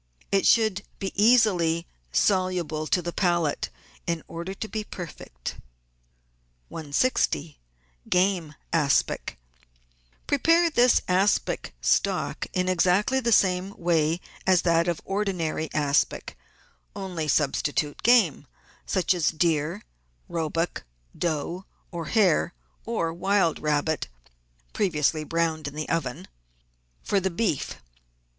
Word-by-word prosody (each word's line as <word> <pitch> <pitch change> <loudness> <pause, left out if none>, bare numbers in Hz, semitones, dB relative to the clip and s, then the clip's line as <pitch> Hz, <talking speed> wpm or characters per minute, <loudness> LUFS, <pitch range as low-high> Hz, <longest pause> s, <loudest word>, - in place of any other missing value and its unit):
It 195 -1 +3
should 215 -4 +4 0.2
be 195 -1 -4
easily 195 -7 +4 0.3
soluble 180 - +1
to 180 - +1
the 175 0 -4
palate 175 -5 0 0.4
in 170 -2 -1
order 170 +3 -6
to 220 - -5
be 215 0 -4
perfect. 150 - -8 1.1
160— 155 - 0 0.5
GAME 180 -4 +1 0.2
ASPIC 145 - +1 0.9
Prepare 330 +4 +3
this 250 -3 +4
aspic 190 - +1
stock - - 0
in 185 0 0
exactly 185 +8 +2
the 235 -2 0
same 190 -1 +2
way 165 -1 +1 0.3
as 185 -2 +4
that 170 0 +3
of 170 -2 -1
ordinary 180 -6 -2
aspic, 145 -1 0 0.6
only 180 -6 -4
substitute 145 0 0
game, 210 - +4 0.4
such 185 0 +2
as 175 -3 +1
deer, 160 -1 0 0.4
roebuck, 165 +1 -2 0.3
doe, 170 +3 -2 0.3
or 170 -2 -5
hare, 180 -2 +2 0.3
or 170 -8 -1
wild 190 -1 +1
rabbit 150 0 0 0.7
(previously 155 -6 +1
browned 160 -1 -1
in 145 - -7
the 155 0 -4
oven), 125 - -2 0.8
for 200 - +1
the 190 0 -1
beef. 180 -4 -1
175 Hz, 110 wpm, -26 LUFS, 155-195 Hz, 1.1 s, should